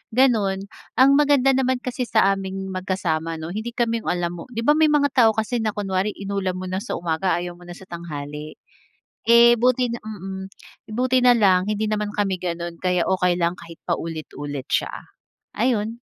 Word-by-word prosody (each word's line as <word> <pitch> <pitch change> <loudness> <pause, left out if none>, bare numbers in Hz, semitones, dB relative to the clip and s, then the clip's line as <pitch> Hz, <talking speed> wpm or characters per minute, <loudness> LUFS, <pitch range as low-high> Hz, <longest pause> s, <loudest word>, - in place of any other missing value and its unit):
ganun. 205 -6 +2 0.2
Ang 275 +4 +6
maganda 280 -2 +4
naman 260 -1 0
kasi 250 -1 -3
sa 195 -3 +4
aming 190 0 -4
magkasama 170 -4 -2
'no, 160 +1 -6
hindi 220 +5 -5
kami 230 -1 0
yung - - -11
alam 175 -1 0
mo 165 - -9
'di 230 - -2
ba, 295 - +5
may 310 +1 +4
mga 285 -2 +2
tao 225 -4 +4
kasi 225 +2 -1
na 215 -2 -1
kunwari 195 0 -1
inulam 195 -2 -3
mo 185 - -5
na 190 - -1
sa - - -4
umaga 170 +2 0
ayaw 175 0 -5
mo 175 - -14
na 175 - -8
sa 190 - -13
tanghali. 150 -3 -7 0.7
Eh, 235 +1 +7
buti 250 +1 +2
na 235 0 -4
mm, 190 -2 -6 0.5
buti 255 +2 +2
na 245 - +8
lang 190 -5 +4
hindi 210 +1 -1
naman 210 -1 -2
kami 200 -3 0
gano'n. 170 -1 -4
Kaya 180 -1 0
okey 180 -2 +1
lang 170 +1 +1
kahit 165 -1 -12
paulit-ulit 145 -4 -4
siya. - - 0 0.6
Ayon. 230 -2 0
195 Hz, 185 wpm, -23 LUFS, 175-235 Hz, 0.7 s, na